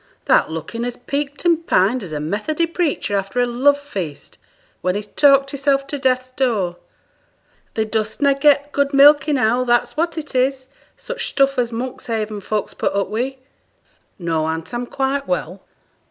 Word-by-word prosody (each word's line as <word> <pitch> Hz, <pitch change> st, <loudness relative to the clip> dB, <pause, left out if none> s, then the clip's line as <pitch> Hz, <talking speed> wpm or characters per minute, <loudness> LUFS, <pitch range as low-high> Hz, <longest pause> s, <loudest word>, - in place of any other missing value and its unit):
Thou'rt -, -, +4 dB
looking 165 Hz, +9 st, -5 dB
as 245 Hz, 0 st, -3 dB
peaked 285 Hz, +4 st, -4 dB
and 335 Hz, -1 st, +2 dB
pined 215 Hz, +8 st, +3 dB
as 185 Hz, -6 st, -8 dB
a 150 Hz, -, -3 dB
Methody 210 Hz, -, -1 dB
preacher 330 Hz, -, -1 dB
after 195 Hz, +4 st, -2 dB
a 245 Hz, -, +4 dB
love 260 Hz, +4 st, +3 dB
feast, 190 Hz, -, -7 dB, 0.4 s
when 180 Hz, +1 st, 0 dB
he's 205 Hz, 0 st, -3 dB
talked 275 Hz, +4 st, +4 dB
hisself 275 Hz, 0 st, +1 dB
to 285 Hz, +1 st, -5 dB
Death's 255 Hz, -1 st, 0 dB
door. 215 Hz, -10 st, 0 dB, 1.0 s
Thee 220 Hz, -, +1 dB
dost 220 Hz, 0 st, -2 dB
na' 280 Hz, -1 st, +4 dB
get 285 Hz, +1 st, +3 dB
good 280 Hz, 0 st, 0 dB
milk 290 Hz, +2 st, +7 dB
enow, 255 Hz, -4 st, +2 dB
that's 240 Hz, -1 st, +1 dB
what 335 Hz, +2 st, -1 dB
it 300 Hz, -2 st, -6 dB
is, 260 Hz, 0 st, 0 dB, 0.3 s
such -, -, -4 dB
stuff 275 Hz, -1 st, +2 dB
as 240 Hz, -1 st, 0 dB
Monkshaven 225 Hz, -3 st, -4 dB
folks 210 Hz, +1 st, -3 dB
put -, -, -1 dB
up 200 Hz, -1 st, 0 dB
wi'!' 250 Hz, +5 st, -2 dB, 0.8 s
'No, 165 Hz, -3 st, -1 dB
aunt; 160 Hz, +6 st, -4 dB
I'm 240 Hz, 0 st, -3 dB
quite 275 Hz, +2 st, -2 dB
well. 180 Hz, +1 st, -3 dB
255 Hz, 170 wpm, -20 LUFS, 210-280 Hz, 1.0 s, milk